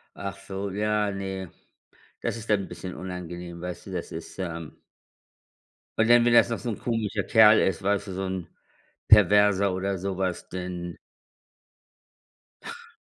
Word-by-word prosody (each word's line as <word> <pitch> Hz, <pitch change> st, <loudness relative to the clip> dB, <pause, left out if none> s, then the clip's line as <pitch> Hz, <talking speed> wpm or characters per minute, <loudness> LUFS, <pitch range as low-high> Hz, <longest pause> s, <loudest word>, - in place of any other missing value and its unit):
Ach 100 Hz, -1 st, -6 dB
so, 100 Hz, 0 st, -5 dB
ja, 105 Hz, 0 st, 0 dB
ne. 95 Hz, -2 st, -5 dB, 0.7 s
Das -, -, -2 dB
ist 115 Hz, 0 st, -9 dB
dann 105 Hz, -2 st, +4 dB
'n -, -, -8 dB
bisschen 90 Hz, -1 st, -7 dB
unangenehm, 90 Hz, -1 st, -7 dB
weißt 90 Hz, +2 st, -6 dB
du, -, -, -8 dB
das 90 Hz, -2 st, -5 dB
ist 80 Hz, +3 st, -8 dB
ähm 85 Hz, -4 st, -5 dB, 1.2 s
Und 115 Hz, -, +4 dB
dann, 120 Hz, 0 st, +6 dB
wenn 120 Hz, -, +4 dB
das 120 Hz, -, +6 dB
noch 115 Hz, -, -2 dB
so 120 Hz, -, -4 dB
ein 110 Hz, -, -3 dB
komischer 110 Hz, -4 st, -2 dB
Kerl 110 Hz, +1 st, +7 dB
ist, 95 Hz, -3 st, +1 dB
weißt 100 Hz, +1 st, 0 dB
du, -, -, -5 dB
so 95 Hz, -, -4 dB
'n 95 Hz, -3 st, -4 dB, 0.6 s
Perverser 100 Hz, -1 st, +5 dB
oder 95 Hz, +1 st, -2 dB
sowas, 95 Hz, -1 st, -3 dB
denn 90 Hz, -1 st, -6 dB, 1.7 s
Ach. -, -, -9 dB
95 Hz, 155 wpm, -26 LUFS, 90-105 Hz, 1.7 s, Kerl